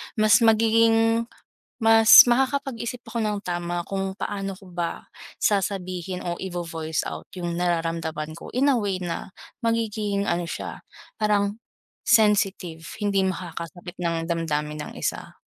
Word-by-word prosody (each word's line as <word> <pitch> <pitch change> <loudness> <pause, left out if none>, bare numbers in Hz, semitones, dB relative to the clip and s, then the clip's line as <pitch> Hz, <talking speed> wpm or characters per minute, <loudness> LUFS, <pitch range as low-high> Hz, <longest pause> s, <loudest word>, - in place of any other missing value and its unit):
mas 215 -2 +5
magiging, 225 +1 +4 0.6
mas 225 0 +9
makakapag-isip 255 -2 -1
ako 235 - -4
ng 210 -1 -1
tama 175 -1 -3
kung 195 -1 -2
paano 195 -1 -4
ko 190 -2 -15
ba 175 -1 -4 0.4
sasabihin 185 -3 -1
o 175 -1 -3
ivo-voice 165 -4 -3
out - - -7
yung 175 -1 -3
nararamdaman 165 -3 -1
ko, - - -10
in 275 +3 +3
a 260 - +3
way 200 -4 -1
na 175 +2 -5 0.3
magiging 215 -3 0
ano 170 0 0
siya - - -6 0.4
parang 205 -1 +1 0.5
sensitive, 195 -6 +2 0.2
hindi 200 -2 +1
makakasakit 175 -1 -5
ng 165 -1 -1
damdamin 150 -3 -2
ng - - -10
isa. - - -4
190 Hz, 125 wpm, -24 LUFS, 170-220 Hz, 0.6 s, mas